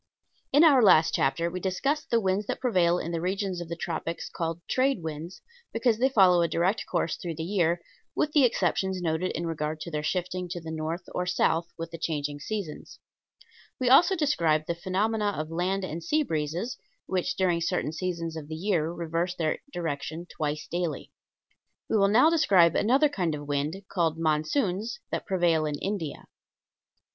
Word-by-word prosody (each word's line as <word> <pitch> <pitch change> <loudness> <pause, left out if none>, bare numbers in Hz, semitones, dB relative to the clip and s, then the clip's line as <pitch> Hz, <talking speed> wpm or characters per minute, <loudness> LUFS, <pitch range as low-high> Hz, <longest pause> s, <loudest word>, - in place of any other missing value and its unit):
In 290 +4 +6
our 285 -6 +7
last 160 -6 +6
chapter 165 +5 +1
we 185 - -4
discussed 235 - -1
the 235 - +3
winds 195 0 0
that - - -2
prevail 180 -9 +2
in 170 - -4
the 165 -1 -2
regions 190 0 -2
of 170 - -7
the 170 - -3
tropics 165 0 -4
called 165 0 -3
trade 260 -7 +1
winds, 160 +3 -6 0.3
because 230 -1 +1
they 260 +2 +4
follow 185 -8 +5
a 170 - +3
direct 180 +6 0
course 170 -2 -1
through 170 -2 -5
the 160 - -4
year, 170 -2 +1 0.4
with 300 - +1
the 295 -2 +5
exceptions 190 -4 +1
noted 170 +1 -1
in 170 - -3
regard 155 -1 -3
to 170 - -6
their 150 -1 -2
shifting 180 +2 -2
to 175 0 -4
the 160 -1 -7
north 160 +2 -3
or 180 0 -2
south 170 -2 +1
with 165 0 -6
the 165 - -7
changing 145 -3 -2
seasons; 185 -1 -6 0.8
we 255 -1 +2
also 345 +9 +6
described 165 - +1
the 170 - -1
phenomena 205 +4 -1
of 155 +1 -4
land 185 +3 -1
and 170 -2 -5
sea 305 - +1
breezes, 170 - -3 0.3
which 185 -2 -1
during 175 -3 +1
certain 170 -3 -1
seasons 165 -1 -3
of 155 -2 -7
the 155 - -5
year 170 -2 0
reverse 170 +1 -2
their 160 -3 -1
direction 160 - -4
twice 150 -3 -3
daily. 175 -2 -3 0.8
We - - 0
will 200 -1 +4
now 245 +10 +5
describe 190 - +4
another 265 +7 +4
kind 180 - -1
of 145 -1 -8
wind, 145 +7 -2
called 165 -3 0
monsoons, 180 - 0
that - - -3
prevail 170 -5 +2
in 150 - -2
India. 185 -6 -4
175 Hz, 180 wpm, -27 LUFS, 160-200 Hz, 0.8 s, our